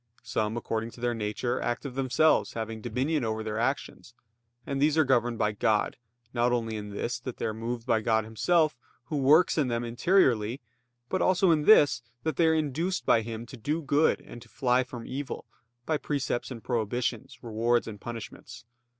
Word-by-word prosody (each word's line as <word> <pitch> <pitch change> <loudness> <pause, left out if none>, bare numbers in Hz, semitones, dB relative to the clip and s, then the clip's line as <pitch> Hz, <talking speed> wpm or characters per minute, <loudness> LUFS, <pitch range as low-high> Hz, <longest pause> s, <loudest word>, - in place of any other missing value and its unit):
Some, 110 0 -1
according 115 -1 -2
to 120 - -13
their 120 0 0
nature, 115 +3 -2
act 120 +4 -2
of 135 - -5
themselves, 135 +4 +2
having 110 -1 -5
dominion 130 +6 -1
over 110 -1 -2
their 110 0 -3
actions; 120 -1 -3 0.5
and 140 -1 -2
these 150 +1 +3
are 160 - +6
governed 120 -3 +1
by 105 - +1
God, 105 0 +1 0.4
not 120 0 +2
only 115 -2 -1
in 105 -1 -6
this, 105 +4 -3
that 130 - -7
they - - -3
are 110 - -1
moved 115 +1 -4
by 110 - +2
God 110 0 +2
Himself, 155 +9 +2 0.3
Who 150 - -1
works 150 +5 +4
in 140 - +2
them 120 -1 -1
interiorly; 120 - +2 0.5
but 185 - -1
also 185 -1 +4
in 150 -2 +2
this, 145 - +6 0.2
that 160 - -1
they 165 - +4
are 160 - +4
induced 160 +5 -1
by 115 - +4
Him 115 +1 -6
to 130 - -11
do 150 +8 -2
good 145 +3 +2
and 120 - -11
to - - -15
fly 125 0 +2
from 120 -2 -9
evil, 140 +1 -5 0.4
by 155 - +1
precepts 135 -4 -2
and 120 -4 -8
prohibitions, 120 +1 -2
rewards 115 +1 +1
and 105 -3 -8
punishments. 115 0 -8
120 Hz, 190 wpm, -28 LUFS, 115-145 Hz, 0.5 s, are